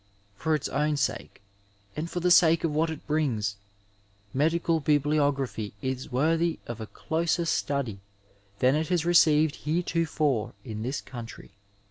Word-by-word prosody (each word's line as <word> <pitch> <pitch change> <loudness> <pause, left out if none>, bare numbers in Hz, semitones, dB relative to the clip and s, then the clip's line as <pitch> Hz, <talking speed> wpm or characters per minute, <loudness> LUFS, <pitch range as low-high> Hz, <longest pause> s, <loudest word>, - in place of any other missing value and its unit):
For 155 +9 0
its 150 - -2
own 150 +2 0
sake 135 -6 -3 0.5
and 160 +3 -3
for 175 - -3
the 180 +1 +2
sake 165 -1 +6
of 160 -3 0
what 160 +2 +1
it 160 -2 -7
brings, 120 -10 0 0.8
medical 165 +3 +1
biblio 145 0 +3
graphy 125 -6 -4
is 130 +3 -4
worthy 165 +6 +1
of 120 -1 -6
a 110 - -6
closer 170 +5 -1
study 140 -10 -1 0.6
than 130 +4 +3
it 155 +1 0
has 175 -3 0
received 160 -3 +4
heretofore 155 -7 0
in 110 -3 -5
this 130 +5 -3
coimtry. 120 -6 -9
150 Hz, 145 wpm, -27 LUFS, 130-165 Hz, 0.8 s, sake